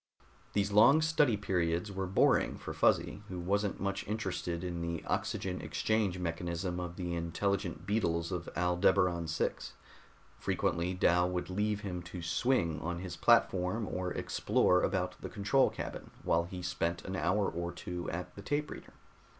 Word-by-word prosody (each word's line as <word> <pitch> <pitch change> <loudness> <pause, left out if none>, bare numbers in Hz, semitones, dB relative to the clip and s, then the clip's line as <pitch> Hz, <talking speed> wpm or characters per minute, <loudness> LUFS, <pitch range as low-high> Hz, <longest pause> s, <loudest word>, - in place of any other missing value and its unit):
These 100 0 +1
long 135 +10 +6
study 150 -8 +3
periods 90 -1 0
were 95 -1 -3
boring 95 - +3
for - - -6
Fuzzy 100 - +2
who 90 -1 -5
wasn't 100 +3 0
much 100 0 -2
interested 95 -5 -3
in 85 -2 -3
the 85 -1 -3
oxygen - - -2
exchange 110 -4 0
mechanism 85 +1 -3
of 90 -1 -5
the 90 -2 -3
intelligent 85 0 -2
beetles 85 -5 0
of 90 -2 -3
Aldebaran 90 -1 +2
VI. 80 - +1 0.9
Frequently 85 +2 0
Dal 90 0 +3
would 90 0 -3
leave 105 +2 0
him 90 -4 -4
to 85 +1 -8
swing 85 -4 +1
on 85 +1 -3
his 90 0 -6
platform 105 -2 +3
or 90 0 -3
explore 90 0 +2
about 95 -2 -1
the - - -5
control 105 +6 +3
cabin - - -6
while 85 +1 +2
he 90 0 -7
spent 85 0 -2
an 95 - -4
hour 95 +4 +1
or 85 +1 -3
two 90 0 -5
at 90 +2 -5
the 100 - -9
tape 145 +7 -1
reader. - - -10
90 Hz, 160 wpm, -32 LUFS, 85-100 Hz, 0.9 s, long